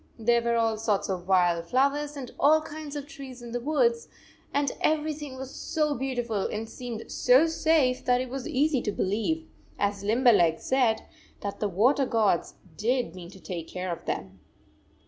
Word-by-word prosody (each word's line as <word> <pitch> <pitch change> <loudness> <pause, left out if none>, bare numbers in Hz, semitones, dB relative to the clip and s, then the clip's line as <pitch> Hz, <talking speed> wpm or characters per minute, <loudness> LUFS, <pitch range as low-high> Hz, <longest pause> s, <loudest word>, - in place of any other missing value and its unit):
There 235 +1 +3
were 235 0 +1
all 225 -1 +1
sorts 215 -3 0
of 180 -2 -3
wild 175 -3 +3
flowers 285 - +1
and 260 -3 -7
all 305 +3 +6
kinds 305 -1 -7
of 290 -1 -4
trees 270 -5 -10
in 235 - -8
the 245 - -2
woods, 460 - +1 0.4
and 280 -2 +1
every 310 0 +1
116 295 - -11
thing 260 - -10
was 265 0 -7
so 305 -3 -1
beautiful 245 -6 -2
and 220 +1 -4
seemed 235 -1 -7
so 255 +5 +5
safe 315 -5 +2
that 250 -1 +3
it 255 0 -3
was 270 -1 -4
easy 290 -2 +1
to 210 - -1
believe, 225 +14 -1 0.3
as 200 -1 -1
Limberleg 210 -7 +4
said, 250 -4 +1 0.4
that 200 -1 -5
the 210 - 0
water 250 +9 +3
gods 215 -7 +1 0.2
did 240 -4 0
mean 175 -2 -9
to 190 - -13
take 170 -3 -6
care 185 0 -4
of 170 - -6
them. 95 0 -4
245 Hz, 185 wpm, -27 LUFS, 205-285 Hz, 0.4 s, all